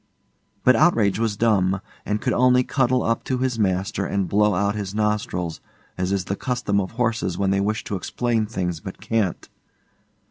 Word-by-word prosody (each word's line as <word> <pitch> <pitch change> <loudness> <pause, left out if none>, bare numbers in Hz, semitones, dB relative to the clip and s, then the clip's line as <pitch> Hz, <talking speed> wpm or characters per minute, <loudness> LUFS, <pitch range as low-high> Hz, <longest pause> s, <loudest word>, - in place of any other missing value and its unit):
But 130 - +6
Outrage 110 - +3
was 110 -3 0
dumb, 95 -5 +2 0.3
and 105 +1 0
could 125 - 0
only 125 0 +4
cuddle 130 -1 +1
up 115 - 0
to 130 - -1
his 125 -2 -1
master 95 0 0
and 100 -1 -1
blow 105 +2 +3
out 100 +2 +1
his 100 -2 -5
nostrils, 105 -6 -1 0.3
as 90 +1 -2
is 95 -2 0
the 100 - -2
custom 120 -4 -1
of 95 - -6
horses 115 -6 -1
when 95 -1 +1
they 100 0 +2
wish 105 +2 -1
to 100 - -4
explain 115 +4 -1
things 90 -6 -3
but 95 +3 -8
can't. 110 -6 -1
105 Hz, 180 wpm, -23 LUFS, 95-115 Hz, 0.3 s, But